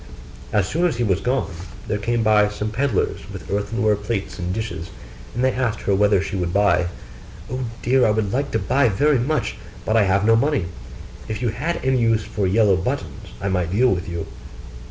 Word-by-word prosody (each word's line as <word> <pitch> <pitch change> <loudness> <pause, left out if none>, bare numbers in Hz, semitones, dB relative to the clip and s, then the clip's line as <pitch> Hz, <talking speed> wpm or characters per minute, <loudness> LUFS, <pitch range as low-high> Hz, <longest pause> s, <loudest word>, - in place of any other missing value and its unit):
As 105 -3 +2
soon 170 - +1
as 155 - -2
he 120 - 0
was 95 -4 +1
gone, 125 -5 0 0.4
there 105 - -1
came 115 +2 0
by 105 -1 +4
some 105 +1 -4
pedlars 125 -2 0
with 95 -1 -8
earthenware 105 +2 +1
plates 105 -1 -4
and 90 0 -2
dishes, 105 -4 -4 0.5
and 120 - 0
they 130 - +4
asked 120 -4 -1
her 100 - +1
whether 100 0 +4
she 100 - -4
would 90 -2 -1
buy. 100 -2 +3 0.6
'Oh 130 0 -2 0.2
dear 130 +2 +3
me, - - +5
I 105 - +2
should 105 -3 -1
like 140 +2 0
to - - 0
buy 135 -3 +2
very 140 +7 +3
much, 140 +2 -1 0.3
but 110 - +1
I 110 -3 +5
have 95 +1 +2
no 115 +1 +5
money: 140 - +1 0.6
if 110 +1 -4
you 120 - +2
had 170 +10 -2
any 130 -1 +3
use 115 -2 +2
for 100 -2 -2
yellow 100 -1 +4
buttons, 95 - -4
I 100 - -2
might 90 -3 0
deal 125 +6 +4
with 90 -2 -1
you. 85 -1 -4
105 Hz, 210 wpm, -22 LUFS, 100-125 Hz, 0.6 s, me